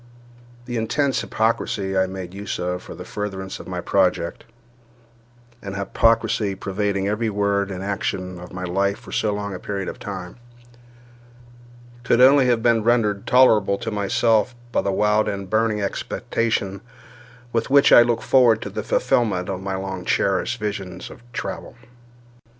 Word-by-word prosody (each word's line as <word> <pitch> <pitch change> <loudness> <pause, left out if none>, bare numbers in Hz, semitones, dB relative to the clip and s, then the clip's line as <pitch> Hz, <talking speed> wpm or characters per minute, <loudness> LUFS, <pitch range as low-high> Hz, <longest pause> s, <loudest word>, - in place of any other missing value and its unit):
The 120 -1 -4
intense 135 +5 0
hypocrisy 105 -3 -1
I 95 0 +2
made 95 -1 -7
use 100 +1 -4
of 90 0 -3
for - - -10
the - - -9
furtherance 95 -2 -5
of - - -10
my 90 -1 -4
project—an 120 +4 -4
hypocrisy 105 0 +1
pervading 100 0 -2
every 110 +2 0
word 100 -1 0
and 95 -1 -5
action 95 -2 -3
of 90 - -10
my 90 0 -6
life 100 +3 0
for - - -13
so 105 - 0
long 100 -1 -4
a 90 - -6
period 100 -1 -4
of - - -6
time—could 95 +2 -7 1.8
only 135 +1 +6
have 120 -2 +2
been 115 -2 +4
rendered 110 -4 +1
tolerable 110 -6 +5
to 115 - -4
myself 110 +3 +1 0.2
by - - +1
the 100 - -1
wild 105 +2 +2
and 100 -2 -5
burning 110 -1 +1
expectation 100 -1 -2 0.7
with 115 +2 0
which 140 +1 +5
I - - +10
looked 120 -1 +1
forward 120 -4 +5
to - - -6
the - - -3
fulfilment 100 -6 +1
of 95 -1 -3
my 95 0 -3
long 95 -1 -5
cherished 100 +7 0
visions 95 -4 -5
of - - -13
travel. - - -6
105 Hz, 150 wpm, -22 LUFS, 95-115 Hz, 1.8 s, I